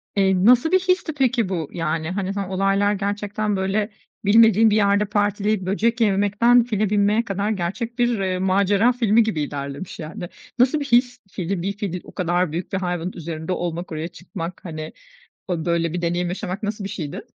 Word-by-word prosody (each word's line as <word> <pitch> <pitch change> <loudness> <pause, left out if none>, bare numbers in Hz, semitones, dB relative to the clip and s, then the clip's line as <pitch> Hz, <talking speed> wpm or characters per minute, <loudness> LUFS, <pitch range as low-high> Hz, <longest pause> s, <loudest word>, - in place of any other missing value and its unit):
Eee, 190 -1 +2
nasıl 250 +7 +5
bir 375 - +5
histi, 365 -4 0
peki, 250 -7 +1
bu? 165 -6 -2
Yani, 165 0 -2
hani, 190 0 -2
hı, 200 -1 -3
olaylar 195 +2 +2
gerçekten, 205 +1 -2
böyle, 195 +3 0 0.4
bilmediğin 220 +1 +6
bir 210 - +2
yerde 205 0 +3
partileyip, 205 0 0
böcek 230 +5 0
yememekten, 210 +4 +4
file 215 -3 -1
binmeye 210 +2 +2
kadar 200 0 -2
gerçek 220 +6 -3
bir, 240 -2 +2
eee, 185 -1 -1
macera 200 +4 +3
filmi 230 -2 +3
gibi 215 -8 -2
ilerlemiş, 140 +4 -5
yani. 170 +2 -6 0.3
Nasıl 260 +5 +4
bir 285 - -3
his? 245 -1 +2
Fili 180 0 -3
bir 195 +3 -2
fili 180 -3 -4
o - - -13
kadar 175 -2 0
büyük 170 +5 -5
bir - - +1
hayvanın 180 -1 -2
üzerinde 165 0 -5
olmak, 175 -1 -3
oraya 155 +1 -3
çıkmak, 175 0 -8
hani, 155 -2 -6 0.5
o, 170 -3 -2
böyle, 170 -1 0
bir 175 - -2
deneyim 175 +1 0
yaşamak 185 +3 -5
nasıl 210 0 -3
bir 195 - -4
şeydi? 155 -8 -5
195 Hz, 185 wpm, -22 LUFS, 175-215 Hz, 0.5 s, bilmediğin